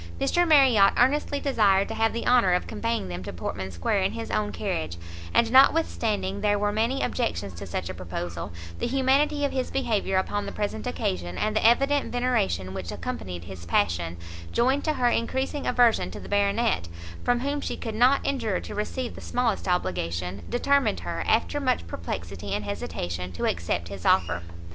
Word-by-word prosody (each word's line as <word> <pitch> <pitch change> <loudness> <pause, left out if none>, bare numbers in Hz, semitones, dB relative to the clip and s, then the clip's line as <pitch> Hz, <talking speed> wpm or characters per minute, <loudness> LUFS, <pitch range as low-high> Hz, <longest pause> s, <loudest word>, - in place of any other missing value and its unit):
Mr 350 0 +2
Marriot 260 -10 +6
earnestly 285 +3 +2
desired 200 -9 +3
to - - -4
have 225 0 +2
the 235 - -4
honour 240 -7 +4
of 180 - +1
conveying 230 - -2
them 90 0 -5
to - - -6
Portman 95 +2 -5
square 85 -2 0
in 95 +2 0
his 115 -1 -5
own 105 0 0
carriage, 85 -2 -3 0.3
and 230 -1 +3
notwithstanding 220 -8 +3
there 205 -1 +2
were 205 0 +1
many 230 +6 0
objections 105 - -2
to 85 +4 -8
such 85 0 -3
a 95 - -4
proposal, 85 -1 -5 0.3
the - - -1
humanity 275 +3 +2
of 280 - -1
his 260 -1 -2
behaviour 215 -7 0
upon 200 +2 -1
the - - -4
present 200 - -3
occasion, 85 +1 -2
and 215 0 0
the - - +1
evident 275 +5 +3
veneration 230 - 0
which 95 -3 -5
accompanied 90 -2 -5
his 90 -1 -9
passion, 85 -2 0 0.3
joined 260 +4 +2
to 310 - +1
her 250 -4 +1
encreasing 265 +5 -1
aversion 240 -2 +3
to - - -8
the - - -10
Baronet, 205 - +1 0.4
from 245 0 +2
whom 285 +2 -1
she - - -3
could 225 - -5
not 250 +5 +4
endure 230 -9 0
to - - -8
receive 235 +4 -3
the - - -10
smallest 240 -6 -1
obligation, 90 - -1
determined 280 +3 +2
her, - - -3
after 290 - +2
much 255 - 0
perplexity 85 +2 -5
and 105 - -3
hesitation, 90 -2 -4
to 85 - -3
accept 85 0 -1
his 100 -3 -8
offer. 85 +1 +2
205 Hz, 180 wpm, -26 LUFS, -, 0.4 s, Marriot